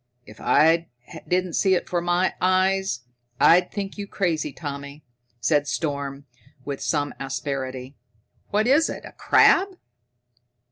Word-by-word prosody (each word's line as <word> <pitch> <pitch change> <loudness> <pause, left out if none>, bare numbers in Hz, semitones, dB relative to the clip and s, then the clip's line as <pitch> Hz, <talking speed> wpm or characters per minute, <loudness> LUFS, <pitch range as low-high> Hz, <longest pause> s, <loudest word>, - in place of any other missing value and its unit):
"If 105 +1 -14
I 165 +3 +3 0.4
didn't 180 -1 0
see 190 +2 +3
it - - -1
before 175 -1 -1
my 175 +2 +1
eyes, 185 -6 +1 0.4
I'd 180 +2 +5
think 200 0 -5
you 200 - -5
crazy, 165 -7 -1
Tommy," 140 -1 -8 0.4
said 145 +3 +1
Storm 140 -3 -3 0.4
with 140 -1 -5
some 145 -2 -1
asperity. 135 -1 -4 0.6
"What 210 +1 +1
is 290 +6 +4
it, - - -6
a - - -10
crab?" 380 0 +3
165 Hz, 130 wpm, -24 LUFS, 140-185 Hz, 0.6 s, I'd